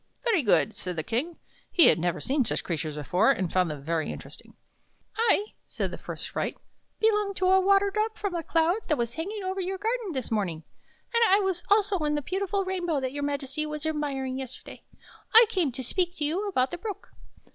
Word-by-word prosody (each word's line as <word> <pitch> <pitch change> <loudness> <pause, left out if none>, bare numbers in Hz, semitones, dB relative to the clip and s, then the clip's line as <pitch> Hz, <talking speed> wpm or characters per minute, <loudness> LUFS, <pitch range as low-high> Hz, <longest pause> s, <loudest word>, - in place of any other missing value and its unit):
" - - -43
Very 450 -9 +3
good," 220 -2 +3
said 180 -1 -5
the 160 - -2
King. 280 - -2 0.3
He 340 - +7
had - - +3
never 175 +1 -1
seen 270 +1 +1
such 220 - -1
creatures 155 -3 -3
before, 180 - +2
and 190 -10 +1
found 185 -2 +2
them 145 -2 -6
very 160 +1 -1
interesting. - - -10 0.3
" - - -42
I," 415 +1 +3 0.2
said - - -3
the - - -6
first - - -6
sprite, - - -3 0.2
" - - -47
belong 420 -2 +2
to 370 - 0
a 380 +1 +5
water 395 +1 +4
drop 435 +2 -1
from 405 -3 -3
a 340 - -1
cloud 330 +3 +2
that 305 - +1
was 235 -1 -2
hanging 395 +5 -4
over 380 +1 -2
your 380 +1 -3
garden 445 -2 -2
this 260 -4 -4
morning, 180 -7 -1 0.5
and 465 - +3
I 390 +2 +6
was 380 -3 -1
also 405 -2 +3
in 300 -1 0
the 295 - -2
beautiful 390 +4 -1
rainbow 350 -5 -1
that 260 0 -3
your 290 - -4
Majesty 285 +1 -2
was 300 0 -5
admiring 275 -4 -2
yesterday. 260 -1 -9 0.5
I 460 +1 +11
came 360 - +1
to 260 - -5
speak 355 +7 -1
to 300 - -2
you 365 +8 -1
about 260 -10 +1
the 350 - -5
Brook." 415 +1 -6
320 Hz, 220 wpm, -27 LUFS, 255-390 Hz, 0.5 s, I